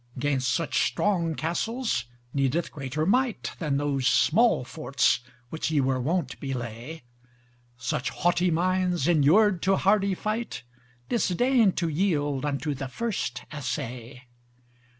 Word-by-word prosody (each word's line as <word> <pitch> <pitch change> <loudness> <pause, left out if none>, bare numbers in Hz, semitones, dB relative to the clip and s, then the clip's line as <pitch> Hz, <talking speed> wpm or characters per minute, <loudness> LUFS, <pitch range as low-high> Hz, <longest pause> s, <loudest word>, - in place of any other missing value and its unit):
'Gainst 130 -2 0
such 165 -3 0
strong 170 -6 0
castles 220 - -1 0.3
needeth 140 +4 0
greater 145 +1 -3
might, 245 +4 +1
Than 150 -5 0
those 140 -2 0
small 220 - +4
forts 135 -2 +1 0.3
which 160 +3 -3
ye 155 -2 +2
were 130 -1 +1
wont 155 0 -1
belay: 125 +2 -6 0.7
Such 125 +2 -2
haughty 175 +1 +1
minds 180 +1 +1
enur'd 175 +4 +4
to 195 +1 +3
hardy 195 0 +2
fight 215 - -3 0.4
Disdain 235 0 +2
to 170 - -1
yield 150 -5 0
unto 145 +1 -1
the 135 0 -5
first 160 - -3
assay. 125 -3 -5
160 Hz, 120 wpm, -26 LUFS, 135-190 Hz, 0.7 s, small